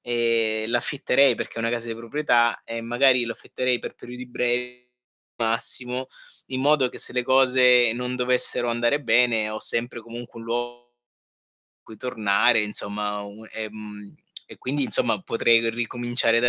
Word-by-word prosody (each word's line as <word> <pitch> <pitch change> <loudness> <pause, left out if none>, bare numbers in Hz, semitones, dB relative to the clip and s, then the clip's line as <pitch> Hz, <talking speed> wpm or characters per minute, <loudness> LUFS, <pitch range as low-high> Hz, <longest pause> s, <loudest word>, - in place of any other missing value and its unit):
e 115 -2 0
l'affitterei 130 +1 +2
perché - - -7
è - - -4
una 115 - -1
casa 120 0 -3
di 115 - -4
proprietà 120 -1 0
e 115 0 -6
magari 125 +1 +2
l'affitterei 125 +2 -3
per - - -9
periodi 125 +1 -10
brevi 125 0 -3 0.5
massimo, 125 +3 -1 0.4
in 130 0 -4
modo 145 -2 +3
che - - -11
se - - +1
le 125 0 0
cose 125 -2 +4
non 125 +1 -4
dovessero 125 -1 +5
andare 120 +5 0
bene, 115 -5 +2
ho 110 - -6
sempre 120 0 0
comunque 115 0 -11
un 115 - -11
luogo 120 +1 -6 0.9
cui 110 - -14
tornare 110 -1 +1
insomma, 105 0 -3
un 105 +2 -12
ehm, 105 -2 -9 0.3
e - - -13
quindi 140 +2 -2
insomma - - +3
potrei 115 -5 +2
ricominciare 120 0 -1
da 120 - +2
120 Hz, 150 wpm, -23 LUFS, 115-125 Hz, 0.9 s, dovessero